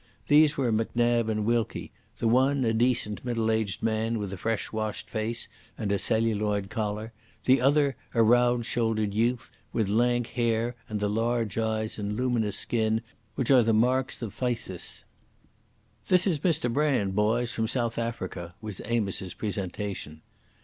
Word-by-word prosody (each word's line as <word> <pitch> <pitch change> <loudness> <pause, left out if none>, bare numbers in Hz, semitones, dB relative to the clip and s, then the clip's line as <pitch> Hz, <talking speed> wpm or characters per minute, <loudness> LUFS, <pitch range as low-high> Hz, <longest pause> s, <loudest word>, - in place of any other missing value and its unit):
These 150 0 +5
were 130 -4 +1
Macnab 115 +1 +1
and 105 -1 -1
Wilkie: 115 -1 -1 0.3
the 115 - 0
one 130 +3 +3
a 115 - +2
decent 115 -2 +1
middle 115 -3 0
aged 110 -3 -1
man 115 +1 0
with 100 -2 -4
a - - -5
fresh 110 +4 -2
washed 110 -1 -3
face 115 +1 -2 0.3
and 105 -2 -2
a 100 - +1
celluloid 105 -3 0
collar, 110 0 -3 0.3
the 130 0 +5
other 140 0 +3 0.2
a 115 - +5
round 120 +1 +4
shouldered 110 -3 0
youth, 115 +3 0 0.2
with 110 -4 0
lank 120 +3 +2
hair 115 0 0
and 105 -1 -2
the 105 - 0
large 115 0 0
eyes 110 -1 -1
and 105 0 -2
luminous 120 -4 0
skin 110 -1 0 0.3
which 130 0 0
are 130 -2 +7
the 115 -1 +2
marks 125 +3 +1
of 105 -3 -5
phthisis. 115 -7 -4 1.0
"This 180 0 +4
is 170 -7 +1
Mr 150 -7 +1
Brand 130 -9 +1
boys, 115 +4 +1
from 110 -1 -1
South 120 -1 -1
Africa," 95 -7 -4
was 105 -3 -7
Amos's 100 -5 -1
presentation. 95 -5 -4
115 Hz, 155 wpm, -27 LUFS, 105-120 Hz, 1.0 s, are